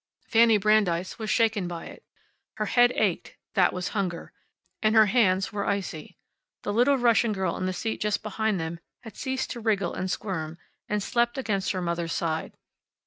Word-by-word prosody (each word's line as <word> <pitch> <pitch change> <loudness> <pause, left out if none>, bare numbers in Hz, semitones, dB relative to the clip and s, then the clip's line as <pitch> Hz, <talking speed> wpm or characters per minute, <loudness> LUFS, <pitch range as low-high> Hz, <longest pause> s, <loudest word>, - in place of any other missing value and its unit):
Fanny 225 -1 +5
Brandeis 195 -3 +1
was 220 -1 -4
shaken 220 -5 +2
by 170 -1 -6
it. - - -12 0.5
Her 215 - -2
head 245 +3 +4
ached - - -1 0.2
(that - - +4
was 180 0 -3
hunger) 185 -5 -3 0.5
and 215 0 +2
her 220 -1 +8
hands 195 -4 +2
were 205 - -2
icy. 195 -6 -3 0.5
The 205 - -2
little 250 +5 +4
Russian 235 -2 +3
girl 190 -3 -1
in 185 - -2
the - - 0
seat 220 +5 -3
just 210 -1 0
behind 215 -1 -1
them 165 +1 -4 0.2
had 225 - -11
ceased 265 0 -3
to 240 - -5
wriggle 205 -5 0
and 185 +1 -3
squirm, 165 -5 -4 0.3
and 210 -1 0
slept 240 +3 0
against 205 -7 -1
her 185 -1 -3
mother's 170 -1 -2
side. 160 -1 -2
205 Hz, 180 wpm, -26 LUFS, 180-225 Hz, 0.5 s, her